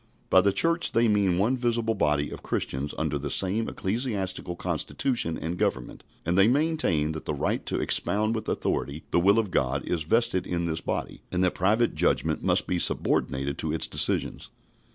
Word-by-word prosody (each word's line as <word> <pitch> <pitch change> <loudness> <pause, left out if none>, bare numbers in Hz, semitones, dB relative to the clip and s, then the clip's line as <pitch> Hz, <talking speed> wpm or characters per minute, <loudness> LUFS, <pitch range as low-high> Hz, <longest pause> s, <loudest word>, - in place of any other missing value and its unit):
By - - +7
the 100 - +2
Church 165 - +2
they 115 +1 +3
mean 100 -4 +2
one 110 +8 +2
visible 120 -2 0
body 75 -6 0
of - - -8
Christians 70 +3 -3
under 70 - -1
the 70 +1 -4
same 100 +8 +1
ecclesiastical 95 -4 -3
constitution 85 - -1
and 85 +1 -4
government, 65 -2 -2 0.2
and 85 +2 0
they 95 +2 +5
maintain 135 - +1
that 80 0 -7
the 75 - -2
right - - -1
to - - -1
expound 110 +2 0
with 110 -2 -4
authority 70 +3 -2
the - - +3
will 100 +5 +4
of 110 -4 0
God 70 -1 0
is 85 - -1
vested 95 +2 +1
in 85 -1 -1
this 80 -1 -2
body, - - -4
and 90 +1 0
that 90 - +2
private 110 +6 +2
judgment - - 0
must - - +2
be 90 - -1
subordinated 70 -3 0
to - - -1
its - - +1
decisions. - - 0
95 Hz, 185 wpm, -26 LUFS, 80-115 Hz, 0.2 s, By